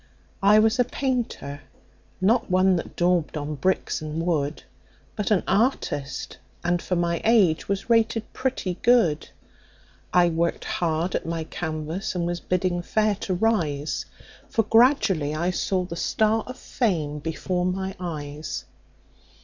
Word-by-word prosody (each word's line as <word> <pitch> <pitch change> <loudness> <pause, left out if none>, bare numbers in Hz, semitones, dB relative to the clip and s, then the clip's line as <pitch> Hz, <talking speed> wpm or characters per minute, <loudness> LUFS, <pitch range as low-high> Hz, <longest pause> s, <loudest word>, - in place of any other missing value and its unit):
"I 205 +2 +6
was 220 +3 +3
a - - +6
painter 240 - -3 0.6
not 215 +6 +2
one 185 0 +4
that - - -6
daubed 175 -3 +1
on 150 +1 -3
bricks 185 +4 0
and 155 +2 -3
wood, 150 -4 -1 0.5
But 210 - -2
an 210 -4 +3
artist, 185 - -1 0.2
and 175 0 +1
for 180 - -1
my 170 -1 0
age, 200 -9 +3
was 200 -1 -1
rated 225 -1 +1
pretty 190 -9 -2
good. 220 -12 +3 0.8
I 175 -1 +5
worked 170 +1 -1
hard 170 +1 -1
at - - -2
my 165 -1 -2
canvas, 160 +5 -4
and 175 -1 0
was 175 0 -2
bidding 180 -1 0
fair 215 +4 +1
to 185 - 0
rise, 165 -9 0 0.4
For 225 - +2
gradually 215 - +3
I 170 +4 0
saw 185 +1 0
the 175 -1 -6
star 220 +5 +1
of 255 +1 -7
fame 160 - -1
before 180 +4 -2
my 190 +1 -2
eyes. 150 -4 -5
180 Hz, 140 wpm, -25 LUFS, 160-215 Hz, 0.8 s, I